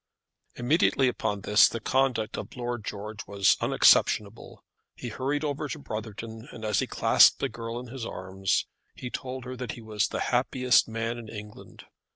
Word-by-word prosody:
Immediately 135 +1 +2
upon 110 -4 -2
this 105 +2 +5
the 115 - -4
conduct 120 -2 0
of - - -7
Lord 120 -2 -3
George 105 +1 -7
was 100 -1 +3
unexceptionable. 105 +2 +2 0.3
He 120 - -6
hurried 135 +6 -2
over 150 0 -2
to - - -4
Brotherton, 110 -1 -7
and 110 -2 -8
as 105 -3 +1
he - - -1
clasped - - +5
his 135 - -2
girl 115 +1 -5
in 125 -1 -9
his 130 -3 -6
arms, 95 -2 -1 0.3
he 125 - -7
told 130 -1 -5
her 130 0 -6
that 125 -3 -5
he 120 - -10
was 105 -2 0
the - - -4
happiest 125 0 +3
man 115 +1 -3
in 115 -2 -10
England. 105 -1 -11
115 Hz, 175 wpm, -27 LUFS, 105-125 Hz, 0.3 s, this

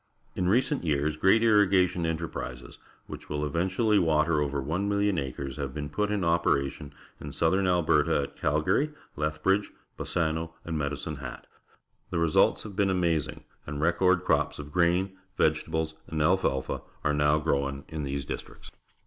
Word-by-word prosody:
In 90 -1 0
recent 130 +5 +2
years 75 -1 0
great 95 +8 +4
irrigation 95 -6 +3
enterprises, 70 -7 -5 0.3
which - - -10
will 75 0 -1
eventually 95 - +1
water 80 -2 +2
over 70 -1 -1
1,000,000 100 +6 0
acres, 70 0 -5
have 70 -2 -4
been 75 -1 -4
put 105 +8 -1
in 105 -2 -1
operation 75 -4 0 0.3
in 75 - -7
southern 95 +6 +1
Alberta 85 -4 +2
at 70 - -8
Ca/gar^j/, 80 - +1 0.2
Leihhridge, 80 +7 0 0.3
Bassano, 80 -1 -1
and 85 - -3
Medicine^ 75 0 -3
JLoL 65 -3 -7 0.7
The 90 - -2
results 85 -2 +3
have 105 -3 -9
been 100 0 +2
amaz 85 -5 +1
ing, - - -14 0.2
and 70 0 -4
record 85 +3 +3
crops - - +1
of 75 0 -8
grain, 90 +3 +2 0.2
vegetable 80 +1 +1
s, 80 0 -7
and 80 - -3
alfalfa 75 -4 +1 0.2
are 75 - +2
now 75 +1 +3
grown 70 -3 -1
in 80 -2 -5
these 70 -1 -3
dis - - -4
tricts. - - -15
80 Hz, 155 wpm, -28 LUFS, 75-95 Hz, 0.7 s, great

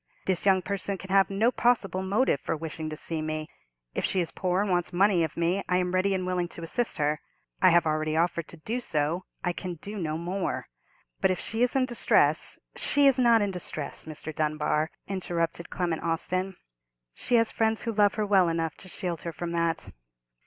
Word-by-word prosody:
This 190 +1 0
young 190 -1 +4
person 200 0 -2
can 190 +1 -9
have 195 0 +5
no 215 +5 +2
possible 230 -7 +1
motive 195 - +1
for - - -2
wishing 160 0 -5
to 155 - -6
see 160 0 -3
me. 155 0 -3 0.5
If - - -2
she 190 - +2
is 170 -2 -1
poor 180 -1 0
and 205 - -1
wants 175 -1 +1
money 185 -1 +3
of 160 - -3
me, 175 +4 +1
I 180 - +3
am 180 0 0
ready 190 +1 +2
and 185 -1 -2
willing 180 -1 0
to 170 - -7
assist 235 +8 -2
her. 150 +1 0 0.4
I 185 - +7
have 170 -1 +5
already 155 0 0
offered 170 -1 +1
to 170 - -10
do 225 +10 -3
so—I 170 -1 -2
can 180 0 -5
do 205 +6 -8
no 155 -3 -2
more. 180 +3 -2 0.5
But - - +3
if 185 - 0
she 225 +1 -2
is 245 +1 +2
in 265 -1 +3
distress——" 240 -2 +2 0.2
"She 285 -1 +3
is 270 -2 +5
not 235 -3 +5
in 200 - -1
distress, 155 -5 -4
Mr. 155 0 -6
Dunbar," 155 0 0 0.2
interrupted 170 -3 -2
Clement 175 -3 -1
Austin. 185 +3 -1 0.6
"She 245 - 0
has 230 -1 +4
friends 220 -1 +1
who 230 - -2
love 205 -1 +3
her 215 - 0
well 190 -4 +4
enough 165 -1 -1
to 185 - -12
shield 175 -3 -4
her 170 - -4
from 170 +1 -5
that." 170 -1 -1
180 Hz, 205 wpm, -27 LUFS, 165-200 Hz, 0.6 s, I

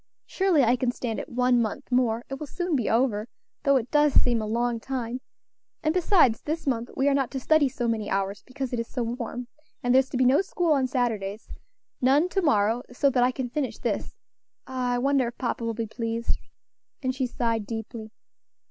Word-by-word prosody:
Surely 375 -7 +2
I 240 +1 +3
can 245 0 +1
stand 235 -3 -3
it - - -7
one 250 0 +3
month 220 +3 -4
more; 240 -2 +1
it 270 0 -6
will 300 - -5
soon 350 +3 -2
be 245 -5 0
over, 225 -2 +1 0.3
though 280 -1 +3
it 250 -2 0
does 295 -1 +4
seem 240 -2 +4
a 215 - -3
long 235 +1 0
time, 250 0 -4 0.6
and 310 0 +2
besides, 340 - +4
this 315 +2 -3
month 240 -3 -1
we 270 - +2
are 285 - +4
not 270 -3 +1
to 265 - -4
study 300 +1 +3
so 245 -2 -3
many 220 -2 -1
hours, 195 0 -1
because 260 -1 -5
it 240 - 0
is 230 - -3
so 245 - -3
warm; 240 +1 -4 0.4
and 245 0 +2
there's 265 0 +4
to - - -3
be 255 - +3
no 260 +6 +5
school 355 -3 -1
on 270 -3 +2
Saturdays; 220 -5 -2 0.5
none 280 +7 +4
to 385 - 0
morrow, 230 - +2
so 275 +3 +2
that 250 - +2
I 250 - +3
can 255 0 -3
finish 285 -2 -2
this. - - -3 0.5
Ah! 250 -1 -1
I - - +1
wonder 270 0 +2
if 235 - -7
papa 240 -2 -2
will 230 -1 -2
be 230 - -2
pleased?" 230 +1 -2 0.6
and 260 0 0
she 260 -1 -1
sighed 230 -3 -1
deeply. 225 0 -6
250 Hz, 210 wpm, -26 LUFS, 230-270 Hz, 0.6 s, no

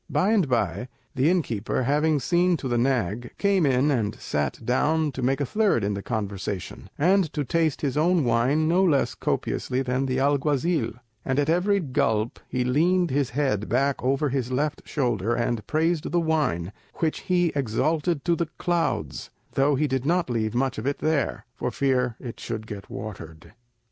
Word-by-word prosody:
By 195 +3 +2
and 195 -10 +2
by, 105 -2 0 0.3
the 140 +2 +2
innkeeper, 130 - 0
having 150 +3 +2
seen 175 +7 +2
to 140 - -5
the 120 -1 +1
nag, 120 -3 -1
came 195 -6 +2
in 135 +3 +3
and 110 -6 0
sat 75 -2 -2
down 150 +5 +1
to 130 - -6
make 135 +2 +1
a 145 - 0
third 205 - +1
in 100 +1 0
the 100 - -4
conversation, 100 -4 -4
and 180 +1 +3
to 150 - -1
taste 165 -1 0
his 140 -4 -1
own 165 +2 +3
wine 130 +6 +2
no 175 +4 +3
less 150 -7 +2
copiously 130 +1 -1
than 130 +1 -1
the 130 0 -1
alguazil; 145 -1 +1 0.3
and 130 - -1
at 145 +2 +2
every 195 +4 +2
gulp 115 - 0
he 125 - 0
leaned 170 +6 +2
his 140 -1 +1
head 125 -6 -1
back 135 +4 +1
over 135 +3 +1
his 130 -2 -2
left 145 +3 -1
shoulder, 120 -5 0
and 120 -2 -1
praised 160 +1 0
the 175 - +2
wine, 140 - 0 0.2
which 160 -2 -1
he 175 -2 +1
exalted 145 +5 0
to 170 -1 +3
the 165 -1 -2
clouds, 165 - -1 0.2
though 140 +1 +2
he 150 +3 +1
did 130 -3 -1
not 170 -1 +1
leave 110 -1 -1
much 130 -2 0
of 115 - -4
it 140 - 0
there, 155 -2 -1
for 125 - -3
fear 125 -2 0
it 120 -3 -8
should 110 -2 -5
get 105 -2 -8
watered. 80 -7 -8
135 Hz, 180 wpm, -25 LUFS, 120-160 Hz, 0.3 s, in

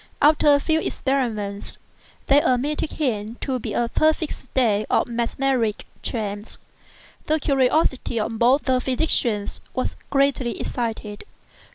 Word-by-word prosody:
After 295 0 +5
a 285 - +5
few 315 +2 +1
experiments, 225 -10 -2 0.5
they 280 +1 +5
admitted 285 +5 0
him 225 -6 -2
to 260 -2 -1
be - - -5
an - - +1
unusually 235 - -2
perfect 315 0 +2
state 230 -6 0
of - - +2
mesmeric 235 -1 -1 0.2
trance. 210 -2 -4 0.7
The 310 +1 +2
curiosity 265 -3 +1
of 220 +1 -3
both 255 +5 +4
the 255 -1 +1
physicians 250 -6 0
was 255 - -1
greatly 275 -3 +1
excited. 220 -4 -4
255 Hz, 130 wpm, -23 LUFS, 225-280 Hz, 0.7 s, After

